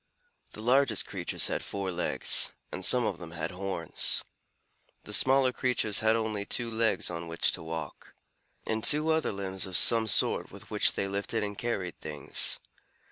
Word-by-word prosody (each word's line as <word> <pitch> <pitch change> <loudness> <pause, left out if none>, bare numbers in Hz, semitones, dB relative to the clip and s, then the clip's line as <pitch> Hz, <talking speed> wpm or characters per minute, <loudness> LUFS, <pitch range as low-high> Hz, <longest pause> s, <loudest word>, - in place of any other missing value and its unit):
The 105 - -8
largest 125 -2 +2
creatures - - -2
had - - -2
four 100 -2 -4
legs, 90 0 +1 0.2
and - - -6
some 125 -2 +5
of 95 -5 -3
them 85 -1 -9
had 80 0 -4
horns. 95 +1 -1 0.8
The 105 - -6
smaller 130 +2 +4
creatures 115 -4 0
had 110 0 +2
only 110 -2 -2
two 115 +3 -1
legs 110 -4 0
on 85 0 -6
which 80 0 +1
to - - -3
walk, 80 -2 -8 0.5
and 110 0 -2
two 150 +2 +5
other 160 0 0
limbs 95 -1 -3
of 90 -1 +2
some 115 -1 +4
sort 100 - +2
with - - -13
which - - +3
they 100 - -2
lifted 100 +3 -3
and 105 0 -4
carried 100 -6 -4
things. 75 -2 0
105 Hz, 170 wpm, -29 LUFS, 90-115 Hz, 0.8 s, some